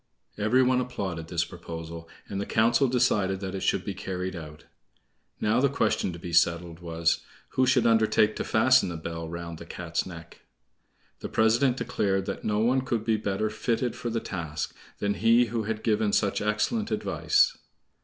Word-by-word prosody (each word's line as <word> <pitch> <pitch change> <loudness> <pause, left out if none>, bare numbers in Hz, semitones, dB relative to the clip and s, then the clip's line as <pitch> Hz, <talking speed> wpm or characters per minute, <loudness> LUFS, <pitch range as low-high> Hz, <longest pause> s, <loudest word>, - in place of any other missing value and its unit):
Every 110 +5 +3
one 125 0 +3
applauded 95 -10 -4
this 85 0 0
proposal, 85 -1 -8 0.2
and 100 0 -3
the - - -4
council 115 +5 +3
decided 105 -6 +1
that 95 -1 -4
it 95 - -3
should 95 - 0
be 100 - -3
carried 95 -1 -4
out. 75 -2 -9 0.7
Now 110 +3 +2
the 140 - +4
question 110 -8 0
to 85 - -8
be 85 0 -7
settled 85 0 +2
was, 85 -1 0 0.3
who 130 0 +1
should 125 -2 +3
undertake 110 -1 +3
to - - -1
fasten 130 -1 +4
the 85 - -5
bell 80 0 -5
round 85 -1 -6
the 85 - -9
Cat's 85 0 -3
neck? 85 -3 -11 0.8
The - - -6
president 120 +4 +3
declared 100 -5 0
that - - -5
no 105 -1 0
one 125 +4 +3
could 115 -4 -2
be 110 - +2
better 105 +1 -1
fitted 115 +2 -1
for 120 - -4
the 115 0 -1
task 80 -8 -4 0.2
than 100 0 0
he 115 +3 +4
who 115 -2 -1
had 110 0 -3
given 105 -2 +1
such 100 -2 +1
excellent 105 - 0
advice. - - +2
105 Hz, 180 wpm, -27 LUFS, 85-115 Hz, 0.8 s, the